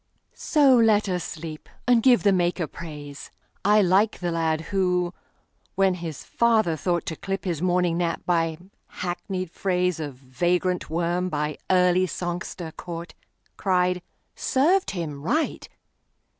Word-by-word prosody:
So 285 -4 +4
let 220 -3 +4
us 180 -3 -1
sleep, 155 -1 -7 0.2
and 245 -2 +5
give 250 0 +5
the 200 - +5
Maker 175 -1 +1
praise.I 155 +7 -2
like 195 +4 +3
the 175 -1 -2
lad 160 -1 0
who, 180 -2 +1 0.6
when 195 -1 +3
his 170 -5 -6
father 220 -8 +2
thoughtTo 170 -1 -2
clip 195 0 -3
his 170 -4 -2
morning 180 -1 +1
nap 170 -1 -1
by 165 -2 +1 0.5
hackneyed 185 0 -4
phraseOf 180 -6 -1
vagrant 175 +8 -1
worm 175 +2 0
by 150 -1 -2
early 180 0 +4
songster 175 -1 -4
caught, 170 +1 -7 0.4
Cried, 180 -1 +1 0.3
"Served 345 +9 +2
him 155 -6 -4
right! 305 - -1
180 Hz, 125 wpm, -25 LUFS, 165-190 Hz, 0.6 s, and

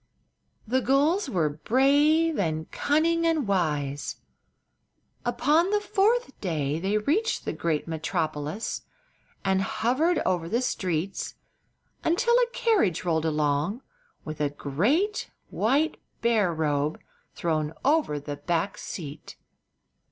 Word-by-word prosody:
The 260 +4 +2
gulls 285 +8 +2
were 175 -9 +1
brave, 285 - +3
and 160 -4 -2
cunning, 330 +3 +2
and 315 -7 +1
wise. 150 -7 -1 1.1
Upon 290 +9 +2
the 415 +1 +2
fourth 420 - +1
day 155 -5 -1
they 195 +4 0
reached 345 - 0
the - - -2
great 160 -2 -1
metropolis, 155 +3 -2 0.6
and 190 0 +2
hovered 270 - +1
over 170 -2 0
the 235 +6 +1
streets 185 -5 -2 0.7
until 470 +9 +2
a 485 0 +4
carriage 400 - +1
rolled 160 -2 +1
along 150 - 0 0.4
with 155 -1 -5
a 145 - +2
great 225 - 0 0.2
white 285 +8 +1 0.3
bear 220 -6 +3
robe 150 -2 0 0.4
thrown 155 -3 -1
over 285 - +2
the 145 0 -6
back 170 +6 -1
seat. 150 -4 -7
200 Hz, 115 wpm, -26 LUFS, -, 1.1 s, a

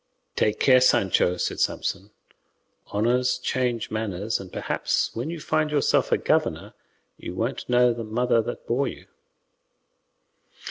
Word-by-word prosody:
"Take 105 - +1
care, 130 -2 +5
Sancho," 95 -7 +3
said - - -2
Samson; 100 +3 -1 0.8
"honours 125 +4 +1
change 125 -2 -2
manners, 110 -1 -2
and 95 -2 -10
perhaps - - -1
when 120 +7 -3
you 170 0 -5
find 155 0 0
yourself 150 -2 +1
a - - +4
governor - - 0 0.4
you 90 - -7
won't 115 +7 -3
know 125 0 +4
the 115 0 -6
mother 115 +2 +1
that 120 +2 -6
bore 135 +4 0
you." - - -8
120 Hz, 135 wpm, -25 LUFS, 110-125 Hz, 0.8 s, care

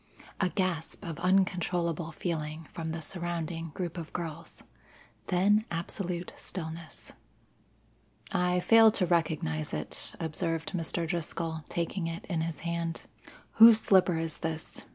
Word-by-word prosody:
A 190 - +2
gasp 185 0 -2
of 165 -3 -5
uncontrollable 175 -3 +1
feeling 155 -1 -4
from 160 -1 -4
the 160 0 -4
surrounding 170 -2 -3
group 175 -1 -3
of 160 - -7
girls, 165 -1 -6 0.6
then 200 +4 +4
absolute 175 +1 -3
stillness. 165 -2 -7 1.2
"I 180 0 +2
fail 225 +2 +7
to 190 - +2
recognize 155 - 0
it," - - -5
observed 165 0 -2
Mr. 170 -1 -1
Driscoll, 165 -2 -3
taking 170 +1 -2
it 165 0 -5
in 170 -4 -1
his 160 -2 -3
hand. 170 -1 -2 0.5
"Whose 225 0 +10
slipper 185 -5 +4
is 165 -1 -2
this?" 160 -1 -4
170 Hz, 125 wpm, -30 LUFS, 160-180 Hz, 1.2 s, Whose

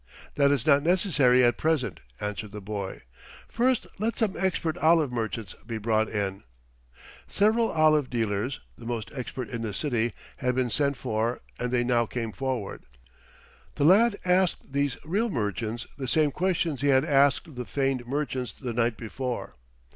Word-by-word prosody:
"That 140 -1 +4
is 140 -4 +1
not 140 -2 +5
necessary 145 -7 +4
at 120 -1 +3
present," 145 - 0 0.2
answered 105 0 -4
the 105 - -5
boy. 100 -1 -5 0.4
"First 245 0 +1
let 225 +3 -1
some 220 -5 +1
expert 170 -3 0
olive 160 -4 +4
merchants 115 -4 -3
be 115 -2 -3
brought 110 0 +1
in." 100 -2 -2 0.9
Several 220 +3 +2
olive 155 -3 +3
dealers, 115 +2 -1
the 115 - -10
most 115 -3 -3
expert 130 -1 -5
in 120 -2 -4
the 110 -3 -3
city, 120 -5 0 0.2
had 125 -1 0
been 125 -2 0
sent 140 0 +1
for, 115 -1 -1 0.2
and 125 - -1
they 125 -1 +2
now 120 -1 +2
came 115 -2 -3
forward. 130 -4 -3 0.9
The - - 0
lad 200 +7 +6
asked 180 -6 +1
these 140 -2 0
real 205 +9 0
merchants 115 - -2
the 130 - -3
same 150 +2 +3
questions 170 -5 0
he 145 - +1
had 135 -1 +4
asked 140 0 +4
of 145 - -13
the 125 0 -4
feigned 135 -3 -1
merchants 130 -3 -2
the 125 -3 -5
night 115 -1 +1
before. 120 - -5
130 Hz, 165 wpm, -27 LUFS, 115-155 Hz, 0.9 s, lad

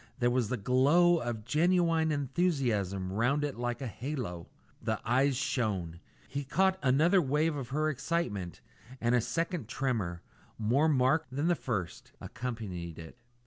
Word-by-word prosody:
There 120 -2 +2
was 125 -3 +1
the 125 - -1
glow 145 - +4
of 120 -4 -4
genuine 165 +2 +2
enthusiasm 130 - 0
round 125 +8 +1
it 145 -2 -2
like 120 +2 -3
a - - -3
halo. 120 - -5 0.3
The - - -1
eyes 130 +3 +2
shone. 100 -11 -1 0.3
He 140 +2 -4
caught 190 +7 +2
another 155 +8 +4
wave 150 +2 +1
of 135 -4 -5
her 155 +3 0
excitement, 120 - -2 0.4
and 120 +1 +1
a 125 - +4
second 165 - -2
tremor, 115 -10 -2 0.3
more 125 +8 +2
marked 145 +3 +2
than 150 +5 +1
the - - +5
first, 100 - -4
accompanied 100 -9 -5
it. 80 +8 -11
130 Hz, 145 wpm, -31 LUFS, 110-155 Hz, 0.4 s, the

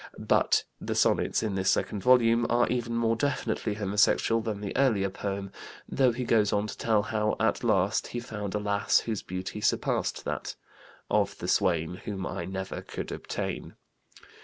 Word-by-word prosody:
But - - +2 0.2
the - - -3
sonnets - - +2
in 110 -3 -1
this 95 0 +1
second 105 - 0
volume 120 -1 +4
are 120 +1 +3
even 120 -1 -1
more 115 -1 +2
definitely 115 -5 -1
homosexual 105 +2 +2
than 110 -2 -3
the 100 -1 -5
earlier 110 -8 +2
poem, 100 0 -4 0.4
though 130 -2 +3
he 125 +2 -3
goes 110 -4 +3
on 105 0 +1
to 105 - -6
tell 110 -3 +1
how 105 0 0
at 110 +1 +1
last 100 -2 +2
he 120 - -4
found 105 -4 -5
a - - +1
lass 100 0 +2
whose 110 -4 -3
beauty 95 +3 -5
surpassed - - 0
that - - -4 0.6
"of - - +1
the - - -5
swain 85 -1 +1
Whom 100 -4 -4
I 85 - -4
never 95 +1 -5
could - - -6
obtain." - - -5
105 Hz, 170 wpm, -28 LUFS, 100-115 Hz, 0.6 s, volume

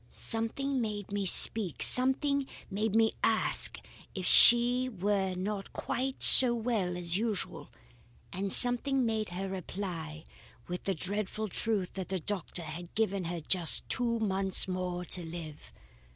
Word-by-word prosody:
Something 255 +4 -1
made 210 -3 -6
me 200 -1 -3
speak; 195 -1 +3
something 270 +2 +4 0.2
made 215 +2 -3
me 225 0 +2
ask 220 -1 0 0.4
if 185 -2 -5
she 245 +5 +5
were 195 -3 -2
not 195 +1 -6
quite 265 +1 -3
so 245 -2 +8
well 220 -7 -3
as 175 0 0
usual, 215 -3 -4 0.6
and 195 +1 -4
something 250 +1 +2
made 220 -2 -3
her 185 +2 -6
reply 175 -4 -7 0.4
with 180 0 -7
the 195 - -2
dreadful 205 +4 -4
truth 205 -1 -2
that 190 -2 -7
the 190 -1 -3
doctor 180 -1 -2
had 170 +2 -10
given 200 -4 -2
her 170 0 -5
just 170 +1 +1
two 235 -1 -1
months 195 -4 +2
more 180 -1 -5
to 175 0 -6
live. 160 - -10
200 Hz, 140 wpm, -29 LUFS, 180-225 Hz, 0.6 s, so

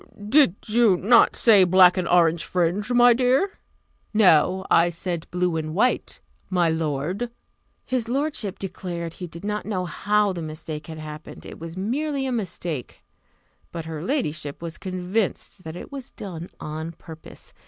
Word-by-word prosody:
"Did 265 - +5
you 220 -3 +3
not 230 +6 +5
say 210 -5 +6
black 180 0 +6
and 185 -2 -1
orange 170 -2 +3
fringe, 180 +5 -1
my 245 0 +6
dear?" 260 - +1 0.6
"No. 190 -1 +4
I 170 +1 +5
said 170 -1 -4
blue 180 -2 0
and 155 0 -4
white, 250 +6 0 0.3
my 175 -3 +2
lord." 160 - -2 0.6
His 250 -3 -1
lordship 270 -7 -2
declared 175 -3 -5
he 180 - -7
did 170 +1 -11
not 210 0 -2
know 185 -4 -2
how 205 +2 +1
the 175 - -5
mistake 155 -1 -6
had 160 -1 -7
happened; 155 0 -9
it - - -10
was 165 +2 -8
merely 270 +7 -1
a 260 - -2
mistake: 175 - -4 0.7
but 165 -2 -6
her 160 -2 -6
ladyship 155 - -2
was 170 -1 -7
convinced 185 +1 -3
that 160 0 -6
it 180 - -9
was 275 -3 -6
done 175 -3 -8
on 160 +2 -5
purpose. 160 0 -13
180 Hz, 155 wpm, -24 LUFS, 165-220 Hz, 0.7 s, say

